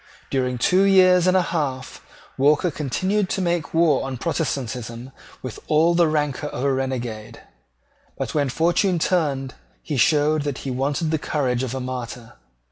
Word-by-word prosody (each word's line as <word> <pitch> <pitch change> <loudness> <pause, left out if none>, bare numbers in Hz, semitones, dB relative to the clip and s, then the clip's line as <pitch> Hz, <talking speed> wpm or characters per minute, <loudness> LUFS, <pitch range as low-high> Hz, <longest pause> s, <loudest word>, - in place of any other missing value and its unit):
During 125 -2 0
two 180 +10 +3
years 185 -2 +5
and 185 +1 +4
a 185 - +3
half, 140 -7 -3 0.3
Walker 150 +5 +3
continued 185 +8 -1
to - - -1
make 175 -4 -1
war 160 -4 +3
on 135 -1 -4
Protestantism 125 -5 -3 0.3
with 130 -3 -6
all 160 +3 +3
the 170 -1 +4
rancour 150 -1 -1
of 125 - -5
a 140 -1 +2
renegade: 125 -5 -4 0.8
but - - -4
when 145 -3 +1
fortune 175 +6 +1
turned 145 -7 0 0.3
he 145 - -3
showed 150 +5 +3
that 145 -2 -3
he 135 - -2
wanted 145 +5 -1
the 160 - 0
courage 130 -6 -1
of 130 -1 -3
a - - -3
martyr. 125 -2 -6
145 Hz, 160 wpm, -22 LUFS, 130-170 Hz, 0.8 s, years